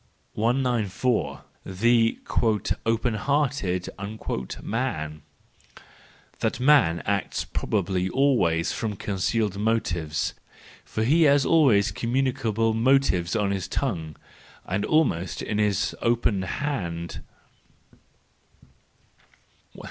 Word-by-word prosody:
194. 115 - 0 0.2
The 115 +4 +2
" 110 -3 0
Open 115 +1 +1
hearted" 125 -7 0 0.8
Man, 80 - -3 1.2
—That - - -1
man 125 - +4
acts 100 -1 -1
prob¬ 110 - -2
ably 95 -1 -1
always 115 - +2
from 110 -3 -3
concealed 100 +1 -1
motives; 90 -8 -1 0.5
for 110 - -3
he 150 +9 +3
has 140 -1 +4
always 130 - +4
communicable 115 0 0
motives 115 -7 +2
on 105 -3 +1
his 95 -3 -2
tongue, 80 -2 -3 0.5
and 95 +2 -1
almost 95 - +1
in 105 - -2
his 105 -3 +1
open 115 -4 +1
hand. 95 - -4
110 Hz, 90 wpm, -25 LUFS, 95-125 Hz, 1.2 s, man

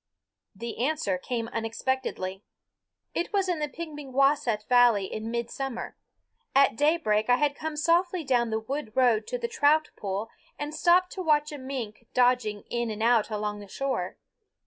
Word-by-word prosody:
The 235 +3 -4
answer 265 -11 0
came 230 +2 -3
unexpectedly. 225 -4 -3 0.7
It 340 - -2
was 395 -2 +1
in 355 -3 0
the 300 - -1
Pemigewasset 275 -7 0
valley 245 -5 +5
in 215 +3 -5
midsummer. 235 +2 -4 0.6
At 275 -5 +5
daybreak 290 -7 +2
I 245 - +7
had 290 +2 +1
come 310 +1 -5
softly 340 +3 +2
down 245 -4 +2
the 220 0 0
wood 225 0 -5
road 240 -4 +3
to - - -2
the 475 -1 -2
trout 310 -8 +3
pool 200 +3 -4 0.3
and 295 +1 -4
stopped 355 +3 +4
to 380 - -5
watch 300 -3 +2
a 295 - -6
mink 245 -4 -6
dodging 245 -4 +2
in 235 -1 -1
and 215 0 -3
out 230 -2 +4
along 210 -1 -3
the 205 - -10
shore. 225 -5 -3
250 Hz, 160 wpm, -27 LUFS, 220-300 Hz, 0.7 s, I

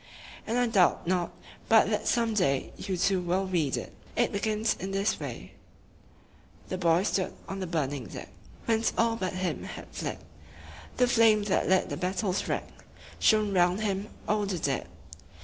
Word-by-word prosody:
I 245 +2 +2
doubt 200 -7 +3
not 180 0 0 0.4
but - - +6
that - - -1
some 230 -2 +2
day 140 -10 +1
you 190 -2 -3
too 185 +1 +2
will 180 +2 0
read 170 -7 0
it. - - -6 0.2
It - - +2
begins 215 +2 0
in 190 - -4
this 195 +2 0
way: - - -7 1.2
"The 185 - -3
boy 170 0 +3
stood 190 -2 -1
on 195 - -5
the 185 - -3
burning 145 -6 -2
deck - - -8 0.4
Whence 225 0 +1
all 230 0 +3
but 185 -5 -3
him 185 -1 -2
had - - -8
fled; - - -4 0.8
The 250 - +4
flame 225 -3 +5
that 205 -2 +1
lit 190 0 +3
the - - -3
battle's 185 +1 -1
wreck - - -2 0.5
Shone 215 -2 +3
round 180 +2 +3
him 200 0 -2 0.2
o'er 210 -1 +1
the 190 -2 -2
dead. 140 -4 -1
195 Hz, 165 wpm, -28 LUFS, 180-215 Hz, 1.2 s, but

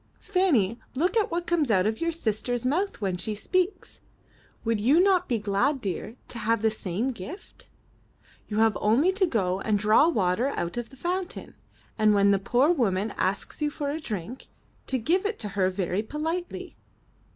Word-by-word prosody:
Fanny, 290 - +2 0.2
look 345 - +1
at 440 -2 +2
what 345 +1 -2
comes 330 -7 +1
out 190 -4 +3
of 220 +5 -1
your 335 0 +1
sister's 245 -4 -1
mouth 345 - 0
when 190 -3 -1
she 215 +4 -2
speaks. 365 - -2 0.6
Would 225 -1 +1
you 275 +9 +4
not 370 -1 +3
be 240 - +2
glad, 215 +8 +1
dear, 200 +1 -4
to 235 - -6
have 225 0 0
the 220 - +3
same 215 +4 -2
gift? 270 - -10 0.8
You 210 - -4
have 225 -1 +4
only 245 - +4
to 380 -1 +1
go 190 - 0
and 215 0 +1
draw 215 +9 +5
water 210 - +1
out 175 -11 -3
of 240 -1 -4
the 270 - -16
fountain, 360 +5 -4 0.5
and 215 -1 +4
when 200 0 +5
a 195 - +2
poor 250 - +3
woman 210 - 0
asks 195 +10 -2
you 300 - +2
for 290 -1 -3
a 310 - -3
drink, 220 - -6 0.4
to 265 - +1
give 340 - +1
it 420 +1 -2
to 210 - -5
her 190 -1 +1
very 185 0 -1
politely.'' 320 +9 -4
235 Hz, 185 wpm, -26 LUFS, 205-325 Hz, 0.8 s, draw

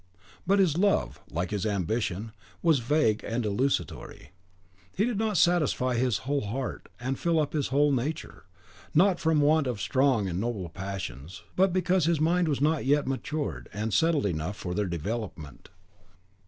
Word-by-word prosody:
But 200 +2 +4
his 175 -5 +3
love, 200 0 +1
like 85 +2 -3
his 105 -2 -2
ambition, 105 +1 -1 0.3
was 160 -5 +4
vague 120 -3 +1
and 115 +1 -2
desultory. 110 +2 -2 0.7
It 205 - +3
did 235 -4 -1
not 220 -3 0
satisfy 150 -7 +2
his 125 -2 0
whole 140 +1 0
heart 125 +6 -4
and 130 +2 -3
fill 170 -2 +2
up 150 -2 -1
his 150 -3 0
whole 145 +2 +3
nature; 140 +4 -3 0.5
not 180 +2 +4
from 160 -2 +2
want 150 0 +3
of 120 -5 -2
strong 130 -4 +2
and 90 0 -2
noble 105 -7 -3
passions, 90 -5 -6
but 190 +1 +3
because 185 -1 +2
his 165 -2 +2
mind 170 +2 +2
was 145 -3 -1
not 155 +1 +2
yet 145 +2 +2
matured 145 +3 -3
and 105 +1 -3
settled 160 - +2
enough 90 +2 -2
for 90 - -4
their 105 +1 0
development. 85 - -5
135 Hz, 165 wpm, -28 LUFS, 105-160 Hz, 0.7 s, But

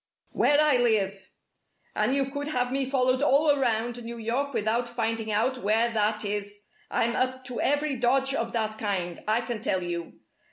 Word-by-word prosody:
"Where 290 0 +3
I 300 -4 +4
live. 200 -5 0 0.7
And 215 +6 +1
you 275 -1 +2
could 285 +1 -4
have 250 -4 -1
me 270 0 -1
followed 255 -1 +2
all 290 +2 +4
around 240 -3 0
New 235 +1 -7
York 240 +5 -2
without 230 +1 0
finding 225 -2 -2
out 245 +5 +1
where 225 +2 +2
that 215 -1 0
is. 205 0 -3 0.3
I'm 235 +1 0
up 260 0 -1
to 250 -1 -3
every 290 0 +1
dodge 265 +3 +2
of 230 -3 -2
that 220 -2 -2
kind, 185 -5 -3
I 220 +2 +2
can 235 -2 -5
tell 185 -4 0
you! 170 -1 -4
235 Hz, 175 wpm, -27 LUFS, 215-260 Hz, 0.7 s, I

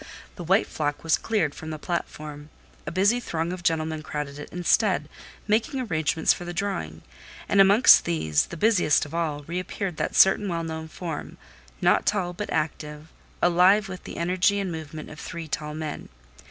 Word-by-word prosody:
The 175 - -7
white 190 +5 +3
flock 145 -1 -3
was 165 -1 +3
cleared 190 -10 0
from 160 - -8
the 155 - -4
platform; 150 -2 -5 0.4
a - - -2
busy 200 +7 +3
throng 170 -6 -3
of 185 - -7
gentlemen 160 -2 0
crowded 150 -2 -5
it 150 - -8
instead, 180 -3 +1 0.4
making 230 +7 +1
arrangements 160 -8 +1
for 175 - -8
the 175 0 -6
drawing; 80 - -3 0.4
and 200 - +5
amongst 200 +6 +7
these—the 80 - 0
busiest 180 -8 +3
of 145 - -11
all—re 165 0 -2
appeared 185 -2 -4
that - - -2
certain 195 +2 +5
well 170 -2 -2
known 160 -1 -5
form, 160 -1 -6 0.4
not - - +3
tall 185 -4 0
but 205 +4 -5
active, 150 0 -3 0.3
alive 185 +4 +5
with 185 -1 -9
the - - -8
energy 185 +4 +2
and 195 -3 -2
movement 155 -1 -7
of 155 - -11
three 165 -1 -7
tall 150 0 -4
men. 155 -1 -6
165 Hz, 170 wpm, -25 LUFS, 155-190 Hz, 0.4 s, amongst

